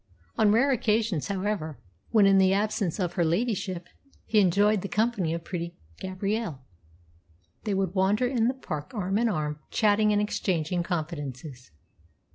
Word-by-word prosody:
On 215 -2 +4
rare 255 +6 +4
occasions, 220 - +1
however, 190 -6 -2 0.3
when, 215 -3 +5
in 195 0 +6
the 190 0 +4
absence 205 -2 0
of 175 -2 -1
her 175 - +1
ladyship, 185 0 -1 0.4
he 215 - +3
enjoyed 205 +2 +3
the 200 - -4
company 215 -6 0
of 165 0 -3
pretty 170 -1 -5 0.2
Gabrielle, 190 - -3 1.1
they 205 -2 0
would 190 -2 0
wander 200 +5 +2
in 245 -3 +1
the 255 - 0
park 155 - -6
arm 195 0 0
in 235 0 +2
arm, 150 -5 -2
chatting 210 0 +3
and 205 - +3
exchanging 180 -4 -1
confidences. 145 - -5
195 Hz, 150 wpm, -27 LUFS, 170-215 Hz, 1.1 s, in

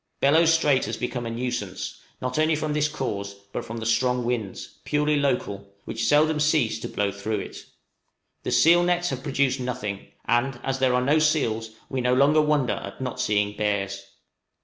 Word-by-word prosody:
Bellot 160 +4 +4
Strait 150 -5 +3
has - - -4
become 125 -1 -3
a - - -3
nuisance, 115 -5 -4 0.2
not 130 +4 -1
only 155 0 +3
from 155 0 -2
this 150 0 +2
cause, 100 -9 -4 0.2
but - - -3
from 115 - -7
the 115 - -5
strong 125 +2 +1
winds 115 -6 -4
purely 150 0 +1
local 125 -8 -1 0.2
which 115 0 -2
seldom 150 +3 +4
cease 150 -6 +2
to - - -5
blow 100 -1 -1
through 105 +2 -3
it. 100 - -7 0.8
The - - -3
seal 170 +2 +6
nets 175 0 +1
have 130 -1 -4
produced 135 -2 0
nothing; 120 -6 -4 0.2
and 120 +1 +1
as 135 0 -2
there 130 -1 +3
are 125 0 +1
no 150 +3 +4
seals, 120 -8 +1 0.2
we 130 -1 -2
no 125 +1 +2
longer 145 +4 +5
wonder 150 -4 +2
at - - -8
not 130 -1 -4
seeing 105 -4 +1
bears. 100 -2 -1
125 Hz, 185 wpm, -25 LUFS, 110-150 Hz, 0.8 s, seal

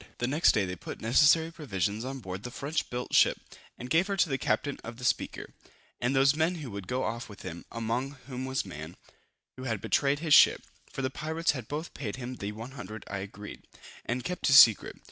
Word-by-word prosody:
The 120 - -1
next 145 +6 +4
day 105 -3 +2
they 90 0 -4
put - - -8
necessary 150 +8 +4
provisions 105 - -2
on 135 +1 -5
board 95 -1 -6
the 125 - -6
French 140 +5 -3
built 125 0 -5
ship, - - +5 0.4
and 125 - -7
gave 165 +8 +3
her 200 -1 -2
to 175 - +3
the 135 -1 -1
captain 145 -1 -1
of 115 0 -8
the 125 - -10
Speaker, - - -1 0.5
and 125 +3 0
those 135 +2 +5
men 160 +3 +1
who 145 -8 -7
would 100 -2 -7
go 130 +5 -1
off 115 +1 -4
with 100 - -12
him, 85 -2 -7
among 120 +5 -3
whom 130 -1 -5
was 130 -3 -2
Man, 80 -2 -8 0.6
who 130 - -7
had 110 -5 -1
betrayed 140 +6 +1
his 155 0 +1
ship; - - +7 0.3
for 135 - -4
the 130 - -1
pirates 160 +4 -1
had 130 -6 -6
both 155 +3 -5
paid 110 -8 -5
him 125 0 -6
the 100 +1 -4
100_l_ 110 -1 -8
agreed, 100 +1 -8 0.4
and 125 +1 -3
kept 180 0 -2
his 135 -2 +7
secret. 115 -6 +7
125 Hz, 215 wpm, -29 LUFS, 110-145 Hz, 0.6 s, ship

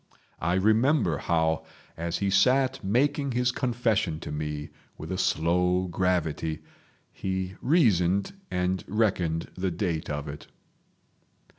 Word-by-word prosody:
I 85 +2 +1
remember 110 - +3
how, 80 -1 +1 0.3
as 85 +1 -2
he 100 -1 0
sat 130 +6 +3
making 135 +6 +1
his 125 0 +2
confession 115 -10 0
to - - -6
me 75 0 -4 0.3
with 80 - -7
a 95 - -2
slow 90 +2 +2
gravity, 80 -3 -1 0.5
he 95 -1 -3
reasoned 100 - +3 0.2
and 90 0 -1
reckoned 90 -7 0
the 95 +1 -1
date 85 -2 -2
of 75 0 -3
it. 75 0 -8
90 Hz, 120 wpm, -27 LUFS, 80-110 Hz, 0.5 s, remember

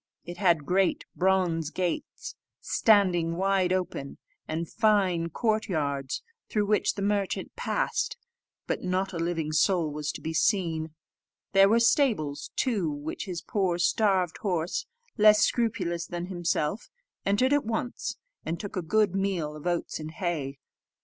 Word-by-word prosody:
It 175 0 -7
had 170 -6 +3
great 185 +4 +1
bronze 180 -4 +1
gates, 175 0 -3 0.3
standing 180 -6 +3
wide 190 -1 +2
open, 180 -7 -2 0.3
and 165 +2 -3
fine 195 -6 +2
court 220 +4 0
yards, 140 -5 -2 0.3
through 210 -1 +1
which 210 0 +1
the 200 - -3
merchant 200 -1 -1
passed; - - -1 0.5
but - - -2
not 185 +1 -1
a 170 - -3
living 165 -2 -1
soul 160 +1 +2
was 150 +1 -3
to - - -7
be 160 - -4
seen. 160 -4 0 0.6
There 195 0 +6
were 230 +2 +4
stables 220 - +2
too, 210 -11 0
which 145 +5 -5
his 175 -4 -5
poor, 190 -4 0
starved 185 -1 +2
horse, 180 -4 -1 0.3
less 210 0 +7
scrupulous 185 -9 0
than 175 0 -4
himself, 175 +2 -2 0.3
entered 230 +8 +2
at 290 - +3
once, 230 +2 -3 0.3
and 165 +1 -3
took 205 - -6
a 185 - -1
good 210 +3 +2
meal 190 -6 -1
of 155 +3 -7
oats 175 -2 -1
and 155 0 -6
hay. 155 -5 -3
180 Hz, 145 wpm, -28 LUFS, 165-205 Hz, 0.6 s, less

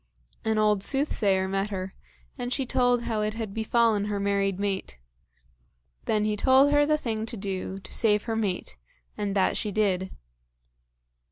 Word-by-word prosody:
An 220 0 0
old 210 -2 +3
soothsayer 200 -7 +1
met 195 +2 -1
her, 190 -1 -5 0.4
and 245 -2 -5
she 270 +1 -1
told 245 -1 +2
how 220 -2 -1
it 215 +1 -1
had 220 -3 -5
befallen 225 -1 +2
her 205 -1 -2
married 200 -1 0
mate. 195 - -3 1.1
Then 210 -1 +1
he 215 0 0
told 265 +6 +4
her 290 0 +4
the 305 0 +3
thing 225 -5 -3
to 230 - -6
do 195 -1 -4
to - - -8
save 210 -2 +2
her 225 -1 -3
mate, 190 - -3 0.4
and 205 -1 -3
that 190 - +2
she 210 - -2
did. 190 -3 0
210 Hz, 165 wpm, -26 LUFS, 195-230 Hz, 1.1 s, told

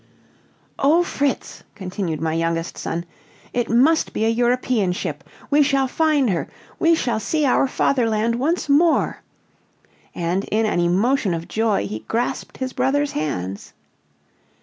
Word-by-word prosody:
"O 315 +6 +4
Fritz," 285 -5 -2
continued 180 -5 -4
my 160 0 -1
youngest 165 0 -1
son, 170 +1 -4 0.5
"it 240 -1 -1
must 275 +8 +3
be 220 - 0
a - - +3
European 240 -4 +1
ship. - - -4 0.3
We 295 +1 +5
shall 275 -2 +2
find 290 -4 +2
her. 170 - -2 0.3
We 330 0 +4
shall 240 -8 -1
see 305 +7 0
our 270 +1 +3
Fatherland 230 -4 +1
once 310 +8 0
more," 310 +3 +3 0.9
and 175 +3 -1
in 220 +1 0
an 210 - 0
emotion 195 +4 +2
of 165 0 -6
joy 220 - 0
he 105 +2 -5
grasped 235 +2 -2
his 260 -1 -4
brother's 280 +3 +1
hands. 100 -11 -4
230 Hz, 140 wpm, -21 LUFS, 180-275 Hz, 0.9 s, We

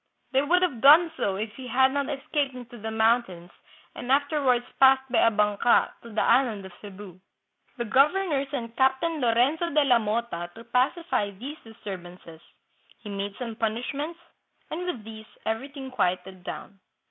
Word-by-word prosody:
They 265 0 +3
would 350 +6 +2
have 275 -11 -1
done 315 +5 +7
so 195 -9 -1
if 210 +2 -4
he 260 0 -8
had 260 +2 +3
not 280 -1 -1
escaped 280 -1 -2
into 245 -1 -10
tKe 220 +1 -5
mountains 220 -6 +1 0.4
and 245 - -5
afterwards 275 -3 +2
passed 265 0 +6
by 235 - +3
a 230 - +5
banka 210 +2 +2
to 235 - -12
the 220 - 0
island 230 -6 +2
of 190 - -10
Cebu. 195 -3 -11 0.6
The 235 - -2
governor 290 - +2
sent 235 -5 -5
Captain 275 +4 +1
Lorenzo 255 +8 +2
de 300 -1 +3
la 250 -4 +4
Mota 215 -5 -3
to 230 - -11
pacify 250 - 0
these 250 +10 -8
disturbances; 180 -6 -10 0.6
he 210 - -8
made 200 0 -4
some 235 -3 -5
punishments, 250 +9 -3 0.5
and 355 +3 -4
with 250 -12 -4
these 220 0 -10 0.2
everything 265 +4 -4
quieted 185 -4 -2
down." 195 +2 -8
240 Hz, 160 wpm, -26 LUFS, 210-275 Hz, 0.6 s, done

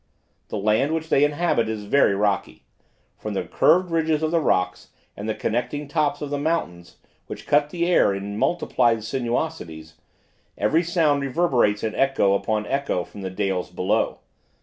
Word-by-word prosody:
The - - -4
land 110 +9 +1
which 160 0 -4
they 140 - +4
inhabit 145 -6 +1
is 110 -2 -4
very 105 -1 +3
rocky: 100 0 -1 0.6
from - - -5
the - - -1
curved 180 0 +2
ridges 160 -1 +1
of 155 - 0
the 170 - +3
rocks 90 - 0 0.3
and 105 +2 -5
the 110 - -1
connecting 140 +6 -2
tops 150 0 0
of 145 - -5
the 145 - -1
mountains, 140 - -3 0.3
which - - -8
cut 145 0 +2
the 170 +1 -1
air 175 - +4
in 100 +1 -4
multiplied 120 -4 +1
sinuosities, 115 - -3 0.6
every 105 +11 +2
sound 165 -5 +1
reverberates 130 -8 +1
in 110 - -1
echo 135 -8 +2
upon 105 +1 -1
echo 135 -9 -1
from 100 - -12
the 95 - -4
dales 95 -1 -2
below. 95 +5 0
125 Hz, 165 wpm, -23 LUFS, 100-155 Hz, 0.6 s, they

